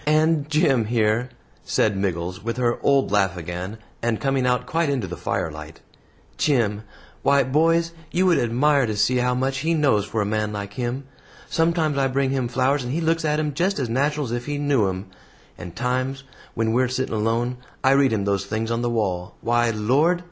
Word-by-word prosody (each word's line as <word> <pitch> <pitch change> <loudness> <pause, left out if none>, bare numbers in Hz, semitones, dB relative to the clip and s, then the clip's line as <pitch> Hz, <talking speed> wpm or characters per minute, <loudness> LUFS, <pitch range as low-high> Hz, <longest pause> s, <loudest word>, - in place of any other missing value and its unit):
And 155 -1 +2
Jim 145 -7 +3
here," 115 +2 +1 0.3
said 105 -2 +1
Miggles, 90 -1 -3
with 115 +2 -3
her 120 -1 +1
old 140 -1 +2
laugh 95 -3 +2
again, 90 +5 -5 0.2
and 115 -2 0
coming 135 -2 +1
out 125 0 +1
quite 165 -1 0
into 130 -7 -1
the 90 -1 -6
firelight, 75 -1 -4 0.6
"Jim 115 -8 +1 0.4
why, 140 0 +4
boys, 165 +5 +2 0.2
you 180 +4 +1
would 180 -3 +4
admire 130 +3 +2
to 105 -1 -3
see 105 +5 +2
how 125 0 +1
much 135 +1 -1
he 165 +4 +1
knows 140 -10 +3
for 110 +2 -3
a - - -3
man 105 0 -1
like 100 -1 -5
him. 125 +2 -3 0.5
Sometimes 165 -3 +1
I 135 - +3
bring 135 0 0
him 130 -3 0
flowers, 130 +3 +1
and 125 - -4
he 155 - -1
looks 165 0 +1
at 150 -1 +1
'em 150 -1 -1
just 185 +7 0
as 130 -5 -2
natural 145 +4 0
as 115 - -6
if 120 +2 -3
he 145 0 -2
knew 140 -8 +2
'em; 95 +1 -5 0.5
and 90 -1 -9
times, 130 +4 -2 0.3
when 115 -1 0
we're 125 +2 +2
sitting 130 0 -2
alone, 115 +3 0 0.3
I 135 - +5
read 135 -1 +4
him 105 -3 0
those 100 -1 0
things 110 +2 -2
on 115 0 0
the 120 - 0
wall. 95 -6 -2
Why, 120 0 +2
Lord!" 135 +11 +2
125 Hz, 200 wpm, -23 LUFS, 110-145 Hz, 0.6 s, I